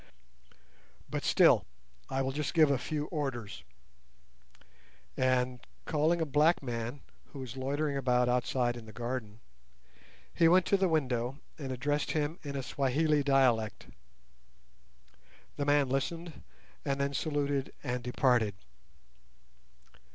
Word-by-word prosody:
But, -, -, -2 dB
still, -, -, +5 dB, 0.5 s
I 135 Hz, 0 st, 0 dB
will 135 Hz, -, -1 dB
just 145 Hz, -1 st, -3 dB
give 155 Hz, -3 st, +6 dB
a 135 Hz, -, +1 dB
few 150 Hz, +2 st, -3 dB
orders;" 135 Hz, -, -4 dB, 1.5 s
and, 125 Hz, -1 st, +1 dB, 0.3 s
calling 160 Hz, +2 st, +1 dB
a 160 Hz, -, +1 dB
black 150 Hz, +3 st, +3 dB
man 120 Hz, +2 st, -4 dB, 0.3 s
who 140 Hz, -, -11 dB
was 130 Hz, -2 st, -7 dB
loitering 140 Hz, +2 st, -1 dB
about 125 Hz, -2 st, +2 dB
outside 125 Hz, 0 st, +1 dB
in 115 Hz, -2 st, -10 dB
the 110 Hz, -, -11 dB
garden, 120 Hz, -2 st, -5 dB, 0.9 s
he 165 Hz, -, +4 dB
went 180 Hz, +2 st, +5 dB
to 200 Hz, -, +3 dB
the 190 Hz, -1 st, +2 dB
window, 130 Hz, -4 st, 0 dB, 0.2 s
and 135 Hz, -3 st, -5 dB
addressed 145 Hz, +3 st, -1 dB
him 155 Hz, +1 st, -1 dB
in 140 Hz, -2 st, -6 dB
a 135 Hz, -, -3 dB
Swahili 145 Hz, +4 st, +1 dB
dialect. 130 Hz, -6 st, +2 dB, 1.7 s
The 145 Hz, -, -1 dB
man 145 Hz, -1 st, +3 dB
listened, 160 Hz, +5 st, -3 dB, 0.4 s
and 140 Hz, 0 st, -1 dB
then 140 Hz, 0 st, 0 dB
saluted 145 Hz, -2 st, -1 dB
and 125 Hz, -2 st, -2 dB
departed. 125 Hz, -4 st, +2 dB
135 Hz, 125 wpm, -31 LUFS, 125-150 Hz, 1.7 s, give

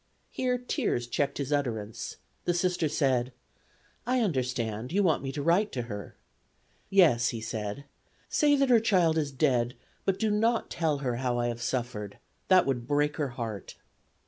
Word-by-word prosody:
Here 250 Hz, -1 st, 0 dB
tears 245 Hz, -, -1 dB
checked 140 Hz, +3 st, -1 dB
his 140 Hz, 0 st, -2 dB
utterance. 115 Hz, -7 st, -2 dB, 0.3 s
The 175 Hz, -, +1 dB
Sister 175 Hz, -2 st, +1 dB
said: 130 Hz, -4 st, +1 dB, 0.7 s
"I 250 Hz, 0 st, +2 dB
understand; 125 Hz, -, -1 dB
you 200 Hz, +3 st, +2 dB
want 165 Hz, -5 st, +2 dB
me 135 Hz, -1 st, -4 dB
to 145 Hz, +1 st, -4 dB
write 185 Hz, +7 st, +3 dB
to 125 Hz, -, -2 dB
her." 105 Hz, -5 st, -7 dB, 0.7 s
"Yes," 155 Hz, -12 st, +5 dB
he 115 Hz, -, -4 dB
said; 110 Hz, +2 st, -4 dB, 0.4 s
"say 295 Hz, -1 st, +3 dB
that 275 Hz, -2 st, +2 dB
her 235 Hz, -, +7 dB
child 185 Hz, -7 st, +3 dB
is 150 Hz, -3 st, 0 dB
dead, 130 Hz, -3 st, +1 dB, 0.3 s
but 195 Hz, -1 st, +1 dB
do 220 Hz, 0 st, +1 dB
not 225 Hz, +2 st, +1 dB
tell 160 Hz, -3 st, 0 dB
her 120 Hz, -2 st, 0 dB
how 125 Hz, -1 st, -1 dB
I 120 Hz, 0 st, 0 dB
have 120 Hz, 0 st, -5 dB
suffered; 120 Hz, -5 st, -3 dB, 0.3 s
that 185 Hz, -1 st, +6 dB
would 120 Hz, -3 st, -2 dB
break 145 Hz, +1 st, +1 dB
her 150 Hz, -3 st, 0 dB
heart." 110 Hz, -5 st, -5 dB
140 Hz, 170 wpm, -29 LUFS, 120-185 Hz, 0.7 s, her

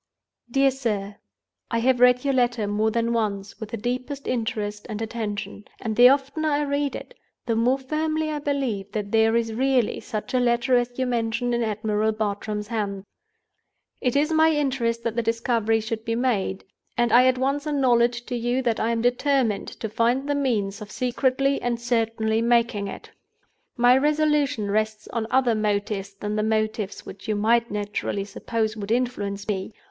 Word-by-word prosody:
"DEAR 270 Hz, +2 st, +3 dB
SIR, 210 Hz, -6 st, -3 dB, 0.5 s
"I 230 Hz, -, 0 dB
have 250 Hz, +2 st, +2 dB
read 250 Hz, +1 st, +5 dB
your 275 Hz, -, +2 dB
letter 245 Hz, -3 st, +1 dB
more 210 Hz, +2 st, +1 dB
than 230 Hz, +1 st, 0 dB
once, 205 Hz, -3 st, -2 dB
with 220 Hz, -3 st, -6 dB
the 230 Hz, -, -4 dB
deepest 255 Hz, +5 st, -4 dB
interest 210 Hz, -3 st, -2 dB
and 215 Hz, -1 st, -4 dB
attention; 215 Hz, -2 st, -4 dB
and 220 Hz, -2 st, -3 dB
the 245 Hz, +2 st, +8 dB
oftener 280 Hz, +3 st, +1 dB
I 295 Hz, 0 st, +1 dB
read 285 Hz, 0 st, -1 dB
it, -, -, -8 dB, 0.3 s
the 230 Hz, -, 0 dB
more 245 Hz, +4 st, +3 dB
firmly 310 Hz, +3 st, -1 dB
I 300 Hz, -, -2 dB
believe 265 Hz, -9 st, -2 dB
that 205 Hz, -2 st, -3 dB
there 225 Hz, 0 st, +4 dB
is 230 Hz, -1 st, 0 dB
really 255 Hz, -1 st, +1 dB
such 215 Hz, +3 st, -5 dB
a 255 Hz, -, +3 dB
Letter 245 Hz, +1 st, +2 dB
as 245 Hz, 0 st, 0 dB
you 260 Hz, -, 0 dB
mention 240 Hz, 0 st, -1 dB
in 235 Hz, -, +1 dB
Admiral 215 Hz, 0 st, 0 dB
Bartram's 210 Hz, 0 st, -3 dB
hands. 200 Hz, -4 st, -3 dB, 1.0 s
"It 250 Hz, 0 st, 0 dB
is 300 Hz, +3 st, +2 dB
my 320 Hz, 0 st, +5 dB
interest 265 Hz, -6 st, 0 dB
that 230 Hz, -1 st, -2 dB
the 235 Hz, -, +1 dB
discovery 230 Hz, -1 st, +1 dB
should 220 Hz, 0 st, -4 dB
be 230 Hz, 0 st, -1 dB
made, 215 Hz, -6 st, 0 dB, 0.3 s
and 240 Hz, -1 st, +2 dB
I 250 Hz, +2 st, +7 dB
at 255 Hz, 0 st, +3 dB
once 275 Hz, +3 st, -1 dB
acknowledge 240 Hz, -4 st, +2 dB
to 250 Hz, -, -4 dB
you 240 Hz, +2 st, 0 dB
that 235 Hz, -3 st, 0 dB
I 225 Hz, -, +1 dB
am 230 Hz, 0 st, 0 dB
determined 245 Hz, -3 st, +1 dB
to 220 Hz, -, -6 dB
find 235 Hz, +5 st, +1 dB
the 290 Hz, -, +1 dB
means 225 Hz, -8 st, -1 dB
of 210 Hz, -, -8 dB
secretly 260 Hz, +3 st, 0 dB
and 240 Hz, -1 st, -1 dB
certainly 225 Hz, -2 st, 0 dB
making 230 Hz, -3 st, +2 dB
it. -, -, -9 dB, 0.7 s
My 245 Hz, +1 st, +6 dB
resolution 295 Hz, -7 st, +1 dB
rests 215 Hz, 0 st, -1 dB
on 225 Hz, -2 st, -2 dB
other 255 Hz, -2 st, +3 dB
motives 205 Hz, -2 st, -1 dB
than 210 Hz, +1 st, -3 dB
the -, -, +2 dB
motives 215 Hz, -2 st, -1 dB
which 195 Hz, -, -10 dB
you 215 Hz, -, 0 dB
might 230 Hz, +3 st, +2 dB
naturally 205 Hz, -1 st, -3 dB
suppose 220 Hz, +2 st, -2 dB
would 205 Hz, -2 st, -6 dB
influence 205 Hz, -5 st, -1 dB
me. 195 Hz, 0 st, -3 dB
235 Hz, 180 wpm, -24 LUFS, 215-255 Hz, 1.0 s, the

